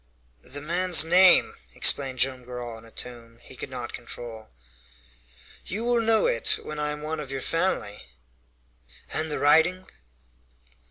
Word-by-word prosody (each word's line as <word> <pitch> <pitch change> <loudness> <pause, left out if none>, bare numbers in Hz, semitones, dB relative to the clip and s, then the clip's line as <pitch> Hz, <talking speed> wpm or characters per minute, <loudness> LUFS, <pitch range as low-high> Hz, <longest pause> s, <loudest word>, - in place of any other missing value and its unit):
"The 145 +3 -7
man's 175 +1 +3
name?" 180 +2 +5 0.2
exclaimed 135 -2 +3
Joam 130 0 -1
Garral, 120 -2 -7
in 115 - -17
a 115 - -17
tone 115 -1 -6
he - - -13
could - - -7
not - - -7
control. 115 -2 -9 1.1
"You 205 +6 -5
will 240 -1 +2
know 225 -1 +2
it 115 - +2
when 150 0 -6
I 150 0 -1
am 150 0 -7
one 155 +1 -3
of 145 -3 -7
your 135 -1 -5
family." 165 - -1 1.1
"And 155 0 -1
the - - -1
writing?" 170 +5 +3
150 Hz, 150 wpm, -25 LUFS, 125-175 Hz, 1.1 s, name